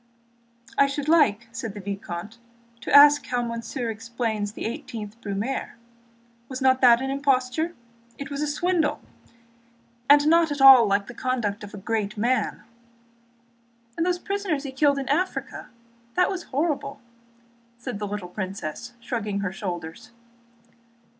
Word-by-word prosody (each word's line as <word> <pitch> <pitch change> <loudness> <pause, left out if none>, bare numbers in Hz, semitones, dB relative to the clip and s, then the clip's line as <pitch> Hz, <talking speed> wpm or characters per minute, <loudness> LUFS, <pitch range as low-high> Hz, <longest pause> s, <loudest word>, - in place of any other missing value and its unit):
"I 280 - +6
should 280 +1 -4
like," 260 -9 +3
said 225 -2 -6
the - - -6
vicomte, 200 +2 -6 0.4
"to - - -6
ask 290 0 +8
how 245 -1 -1
monsieur 230 +1 -4
explains 220 -2 -3
the - - -6
18th 220 -2 -6
Brumaire; 205 +7 -3 0.7
was 260 -1 -5
not 260 -1 +3
that 240 -1 +6
an 270 - -2
imposture? 275 +4 0 0.4
It 280 0 -7
was 280 +1 -3
a 300 - 0
swindle, 315 0 0 1.1
and 290 0 +7
not 330 0 +4
at 290 - -3
all 265 -4 +9
like 200 0 +1
the 240 - -10
conduct 235 -5 -2
of 205 0 -9
a - - -8
great 210 0 -3
man!" 240 0 0 1.3
"And 330 - 0
the 355 0 0
prisoners 390 -8 -2
he 275 - -5
killed 280 +1 +2
in 270 -2 -4
Africa? 345 +7 -2 0.5
That 365 +2 +3
was 365 -3 -5
horrible!" 280 -1 -2 0.8
said 240 -3 -6
the 210 - -3
little 200 -3 -5
princess, 190 +3 -6
shrugging 215 -4 -3
her 195 -2 -2
shoulders. 180 +2 -6
245 Hz, 145 wpm, -25 LUFS, 210-285 Hz, 1.3 s, all